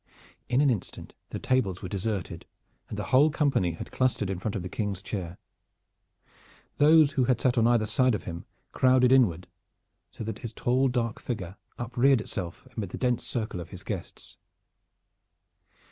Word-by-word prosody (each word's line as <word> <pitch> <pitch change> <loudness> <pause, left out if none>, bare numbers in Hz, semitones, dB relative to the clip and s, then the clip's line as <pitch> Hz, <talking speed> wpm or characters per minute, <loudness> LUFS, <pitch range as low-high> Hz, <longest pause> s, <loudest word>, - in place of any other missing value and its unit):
In 125 +2 +3
an 145 -2 +4
instant 110 -7 -5 0.2
the - - -4
tables 115 -9 0
were - - -3
deserted 95 -3 -4 0.4
and 105 - -6
the 105 - -2
whole 140 +4 +6
company 140 - +1
had 80 - -8
clustered 120 -6 0
in 95 - -3
front 100 +3 -3
of 95 - -3
the - - -4
King's 100 0 -3
chair. 90 -4 -5 1.4
Those 155 0 +6
who 135 -3 +1
had 125 -2 +2
sat 130 -4 +2
on 115 -1 +4
either 120 -2 +3
side 125 +2 +2
of - - -5
him 85 0 -7 0.3
crowded 130 -1 +4
inward 95 -10 +4 0.6
so - - -8
that 110 +1 -5
his 115 -2 -7
tall 130 +4 +2
dark 120 -3 -1
figure 95 -7 -5 0.2
upreared 125 +2 +2
itself 95 +1 -6
amid 105 -5 -3
the - - -6
dense 125 -2 0
circle 110 -6 -3
of 85 - -8
his - - -9
guests. - - -7
115 Hz, 170 wpm, -27 LUFS, 95-130 Hz, 1.4 s, whole